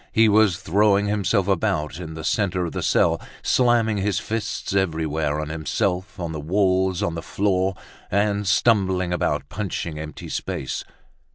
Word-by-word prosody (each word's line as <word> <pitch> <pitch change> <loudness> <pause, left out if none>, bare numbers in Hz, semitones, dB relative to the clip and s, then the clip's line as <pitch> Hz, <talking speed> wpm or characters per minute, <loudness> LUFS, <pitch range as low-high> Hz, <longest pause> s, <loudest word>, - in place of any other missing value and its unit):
He 110 0 +5
was 105 -4 +4
throwing 100 +2 +2
himself 100 -1 +1
about 80 -4 0
in 80 -3 -7
the 80 - -7
center 90 0 0
of 85 - -4
the - - -4
cell, - - +2 0.2
slamming 120 -4 +3
his 100 0 0
fists 110 -3 -3
everywhere, 80 -5 0
on 75 0 -4
himself, 90 +5 -2
on 85 -2 -3
the 80 - -4
walls, 95 +3 +1
on 85 - 0
the 85 - -4
floor, 95 0 0 0.3
and 100 0 +1
stumbling 95 -3 +2
about 75 -5 -1
punching 85 -5 -4
empty 75 -2 -7
space. 65 - -3
95 Hz, 155 wpm, -23 LUFS, 80-100 Hz, 0.3 s, He